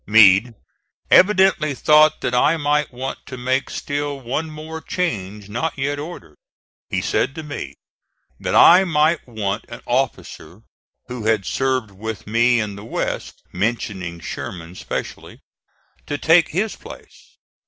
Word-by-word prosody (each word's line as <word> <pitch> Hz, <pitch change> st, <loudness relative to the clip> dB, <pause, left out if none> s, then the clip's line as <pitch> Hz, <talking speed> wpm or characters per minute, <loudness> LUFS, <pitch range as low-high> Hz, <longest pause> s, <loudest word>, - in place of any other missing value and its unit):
Meade 110 Hz, +2 st, +6 dB, 0.6 s
evidently 190 Hz, -7 st, +4 dB
thought 155 Hz, +2 st, +4 dB
that 125 Hz, -, -2 dB
I 150 Hz, +6 st, +3 dB
might 150 Hz, -1 st, 0 dB
want 130 Hz, +2 st, -6 dB
to 130 Hz, -, -7 dB
make 130 Hz, +2 st, -1 dB
still 145 Hz, 0 st, -3 dB
one 135 Hz, +6 st, -3 dB
more 155 Hz, +1 st, -8 dB
change 105 Hz, -, -3 dB
not 125 Hz, +11 st, -3 dB
yet 145 Hz, +1 st, -2 dB
ordered. 145 Hz, -, -9 dB, 0.5 s
He -, -, -1 dB
said 135 Hz, -, 0 dB
to 160 Hz, -, -6 dB
me 145 Hz, -2 st, -7 dB, 0.6 s
that -, -, -2 dB
I 180 Hz, +3 st, +8 dB
might 155 Hz, -3 st, +1 dB
want 105 Hz, -2 st, -3 dB
an 115 Hz, -, -9 dB
officer 110 Hz, -7 st, -3 dB, 0.4 s
who 125 Hz, -3 st, -7 dB
had 110 Hz, -4 st, +1 dB
served 130 Hz, -4 st, -1 dB
with 105 Hz, +1 st, -7 dB
me 120 Hz, +3 st, +3 dB
in 105 Hz, -2 st, -3 dB
the 100 Hz, -, -9 dB
West, 115 Hz, -, -4 dB
mentioning 95 Hz, -4 st, -3 dB
Sherman 85 Hz, +1 st, -7 dB
specially, -, -, -6 dB, 0.7 s
to 145 Hz, -, -2 dB
take 165 Hz, +2 st, +4 dB
his 200 Hz, +6 st, -1 dB
place. -, -, -14 dB
130 Hz, 140 wpm, -21 LUFS, 105-150 Hz, 0.7 s, I